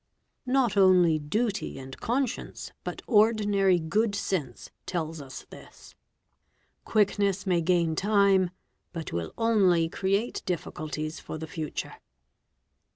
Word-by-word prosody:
Not 250 Hz, -4 st, +2 dB
only 180 Hz, -5 st, +5 dB
duty 210 Hz, -, -2 dB
and 135 Hz, 0 st, -8 dB
conscience 250 Hz, +1 st, -2 dB
but -, -, -6 dB
ordinary 205 Hz, -4 st, +3 dB
good 200 Hz, +6 st, 0 dB
sense 165 Hz, -11 st, -3 dB, 0.2 s
tell 175 Hz, -3 st, -1 dB
} -, -, -8 dB
MUZZLE 160 Hz, -3 st, -8 dB
LOADERS 130 Hz, -, -9 dB
429 -, -, -11 dB
this. -, -, -17 dB, 0.9 s
Quickness 200 Hz, -2 st, +1 dB
may 180 Hz, -3 st, +2 dB
gain 170 Hz, -1 st, +2 dB
time 200 Hz, -1 st, +3 dB, 0.4 s
but 165 Hz, -2 st, -6 dB
will 85 Hz, -1 st, -3 dB
only 195 Hz, -8 st, +3 dB
create 195 Hz, +6 st, -1 dB
difficulties 155 Hz, -3 st, -4 dB
for -, -, -7 dB
the 160 Hz, -, -5 dB
future. 155 Hz, -1 st, -5 dB
185 Hz, 125 wpm, -27 LUFS, 160-210 Hz, 0.9 s, only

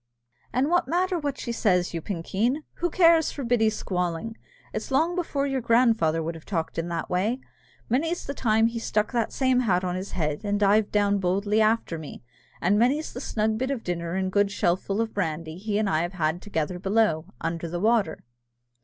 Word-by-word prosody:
"And 260 Hz, +4 st, +1 dB
what 350 Hz, -5 st, +3 dB
matter 360 Hz, +3 st, +1 dB
what 285 Hz, -3 st, -3 dB
she 235 Hz, -, -4 dB
says, 180 Hz, -7 st, +1 dB
you 165 Hz, -, -3 dB
pinkeen? 205 Hz, -, -1 dB
Who 350 Hz, -, 0 dB
cares 330 Hz, -2 st, +4 dB
for 280 Hz, -, -6 dB
Biddy's 225 Hz, -3 st, +2 dB
squalling? 180 Hz, +4 st, -2 dB, 0.4 s
It's -, -, -4 dB
long 320 Hz, +6 st, +2 dB
before 305 Hz, -6 st, -1 dB
your 270 Hz, -2 st, -1 dB
grandfather 225 Hz, -9 st, +3 dB
would 165 Hz, +2 st, -3 dB
have 165 Hz, -1 st, -11 dB
talked 165 Hz, -4 st, -3 dB
in 165 Hz, -, -2 dB
that 170 Hz, -1 st, -3 dB
way. 210 Hz, +8 st, 0 dB, 0.5 s
Many's 325 Hz, +8 st, 0 dB
the 280 Hz, -, -3 dB
time 225 Hz, -4 st, +2 dB
he 230 Hz, 0 st, -1 dB
stuck 210 Hz, -1 st, 0 dB
that 235 Hz, -3 st, 0 dB
same 260 Hz, -2 st, +2 dB
hat 190 Hz, -7 st, +2 dB
on 180 Hz, -1 st, -1 dB
his 185 Hz, +2 st, -5 dB
head, 150 Hz, -4 st, -1 dB
and 205 Hz, 0 st, 0 dB
dived 205 Hz, +1 st, +3 dB
down 205 Hz, -1 st, +2 dB
boldly 200 Hz, +4 st, +1 dB
after 215 Hz, -6 st, +1 dB
me; 150 Hz, -5 st, -9 dB, 0.4 s
and 200 Hz, +4 st, +3 dB
many's 275 Hz, +7 st, +1 dB
the 250 Hz, -, -6 dB
snug 220 Hz, -3 st, -1 dB
bit 260 Hz, +1 st, -1 dB
of 270 Hz, -5 st, -3 dB
dinner 170 Hz, -1 st, -3 dB
and 190 Hz, 0 st, -1 dB
good 205 Hz, +1 st, +3 dB
shellful 195 Hz, +2 st, 0 dB
of 225 Hz, -1 st, -3 dB
brandy 165 Hz, -3 st, -3 dB
he 205 Hz, +1 st, -1 dB
and 215 Hz, -1 st, +1 dB
I 155 Hz, -4 st, +1 dB
have 175 Hz, +2 st, -3 dB
had 165 Hz, -1 st, -1 dB
together 180 Hz, -2 st, -3 dB
below, 195 Hz, -5 st, +1 dB
under 165 Hz, +1 st, -3 dB
the 175 Hz, +1 st, -3 dB
water." 215 Hz, -5 st, +1 dB
210 Hz, 200 wpm, -26 LUFS, 175-245 Hz, 0.5 s, cares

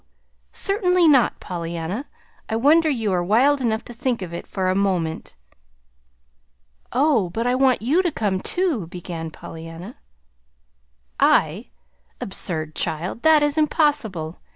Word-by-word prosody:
Certainly 365 Hz, -4 st, +2 dB
not, 270 Hz, -6 st, +4 dB
Pollyanna! 170 Hz, -, -5 dB, 0.4 s
I 220 Hz, -, -1 dB
wonder 310 Hz, +7 st, +4 dB
you 225 Hz, -8 st, 0 dB
are 175 Hz, -1 st, +1 dB
wild 260 Hz, +9 st, +3 dB
enough 220 Hz, -2 st, -1 dB
to 240 Hz, -, -9 dB
think 240 Hz, -3 st, -2 dB
of 170 Hz, -2 st, -7 dB
it 170 Hz, -, -6 dB
for 190 Hz, -2 st, -2 dB
a 185 Hz, -, +2 dB
moment." 185 Hz, -, -1 dB, 1.6 s
"Oh, 255 Hz, -, +2 dB
but 225 Hz, +7 st, -3 dB
I 245 Hz, -, +2 dB
want 255 Hz, -3 st, +2 dB
you 300 Hz, +10 st, +3 dB
to 350 Hz, -3 st, -1 dB
come, 200 Hz, -7 st, -1 dB
too," 310 Hz, -, 0 dB
began 170 Hz, -2 st, -6 dB
Pollyanna. 165 Hz, +7 st, -10 dB, 1.2 s
"I? -, -, +2 dB, 0.5 s
Absurd, 160 Hz, -5 st, -3 dB
child! 170 Hz, +11 st, -3 dB
That 315 Hz, 0 st, +5 dB
is 295 Hz, +1 st, +1 dB
impossible. 285 Hz, -, 0 dB
220 Hz, 130 wpm, -22 LUFS, 175-290 Hz, 1.6 s, That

